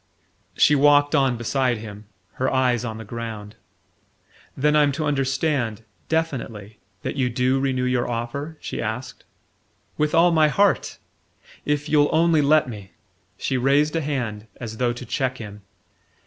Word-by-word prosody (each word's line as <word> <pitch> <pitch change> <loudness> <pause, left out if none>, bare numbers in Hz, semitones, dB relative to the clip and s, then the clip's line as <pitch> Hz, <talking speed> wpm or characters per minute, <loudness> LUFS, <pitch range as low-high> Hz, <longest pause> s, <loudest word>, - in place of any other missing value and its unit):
She 150 - +5
walked 145 0 +4
on 135 -3 +2
beside 125 +1 0
him, 105 -1 -9 0.4
her 130 - +2
eyes 125 -3 +1
on 110 -2 -5
the 110 - -8
ground. 110 -2 -7 1.0
"Then 150 +2 +2
I'm 150 -1 +4
to 155 +3 -2
understand 135 -5 -1 0.3
definitely 115 -10 -3 0.2
that - - -4
you 130 -2 +1
DO 130 +2 +1
renew 130 -2 0
your 125 -1 0
offer?" 130 +7 -4
she - - -5
asked 120 +3 -5 0.7
"With 150 +1 +1
all 170 +2 +5
my 160 -2 +4
heart! 200 +6 +1 0.7
If 150 0 -1
you'll 145 -1 +3
only 165 -1 +3
let 150 +1 +4
me 105 -5 -9 0.2
" 90 -1 -42
She 130 - -1
raised 140 +5 +2
a 165 - +1
hand, 120 -8 -3
as 110 -2 -7
though 125 0 +1
to 120 +1 -7
check 130 0 -2
him. 105 -3 -9
130 Hz, 155 wpm, -23 LUFS, 115-150 Hz, 1.0 s, She